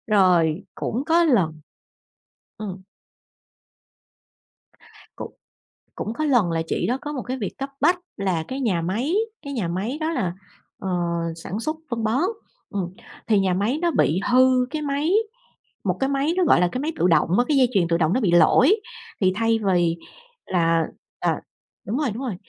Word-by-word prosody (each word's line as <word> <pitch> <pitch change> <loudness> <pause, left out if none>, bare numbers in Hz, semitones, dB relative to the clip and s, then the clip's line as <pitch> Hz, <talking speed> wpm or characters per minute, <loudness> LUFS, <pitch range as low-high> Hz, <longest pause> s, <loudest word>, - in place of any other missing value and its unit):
Rồi 180 -4 +3
cũng 245 +5 -2
có 335 +2 +4
lần 185 - +2 1.0
ừm. 195 -3 -6 2.4
Cũng - - -7 0.6
cũng 215 - -4
có 310 +6 -2
lần 240 - +3
là 165 0 0
chị - - -1
đó 250 - 0
có 295 - -5
một 265 - -3
cái 255 +1 -4
việc 210 -6 -5
cấp 275 0 -4
bách 350 +5 +4 0.2
là 185 -5 -1
cái 265 - -4
nhà 195 -9 +1
máy, 220 - -1 0.3
cái 280 -1 -6
nhà 220 -10 -1
máy 195 - -3
đó 315 - 0
là, 200 - -1 0.5
ờ, 195 - -4 0.5
sản 170 +5 -5
xuất 310 +6 -2
phân 235 -2 -2
bón, 225 +6 +1 0.5
ừm, 190 -4 -3 0.4
thì 215 -3 +4
nhà 190 -2 +1
máy 205 +9 0
nó 345 -1 +2
bị 170 - +2
hư 255 0 +5
cái 305 +2 -3
máy, 290 +4 0 0.7
một - - 0
cái 270 - +1
máy 280 +3 +1
nó 370 - +4
gọi 265 - +5
là 180 - +4
cái 255 - -3
máy 315 +3 -2
tự - - +4
động 170 - +3
á, 245 - +3
cái 295 - +2
dây 255 -2 +4
chuyền 185 -5 +3
tự 170 0 +2
động 165 0 +2
nó 255 - +2
bị 195 -6 +2
lỗi, 260 - +6 0.5
thì 185 -1 +3
thay 225 +1 +2
vì 170 -1 +2 0.5
là 165 -2 +2 0.3
à, - - 0 0.5
đúng 220 +6 -1
rồi, 290 -5 0
đúng 240 +5 -5
rồi, 240 -7 -3
225 Hz, 185 wpm, -23 LUFS, 180-275 Hz, 2.4 s, lỗi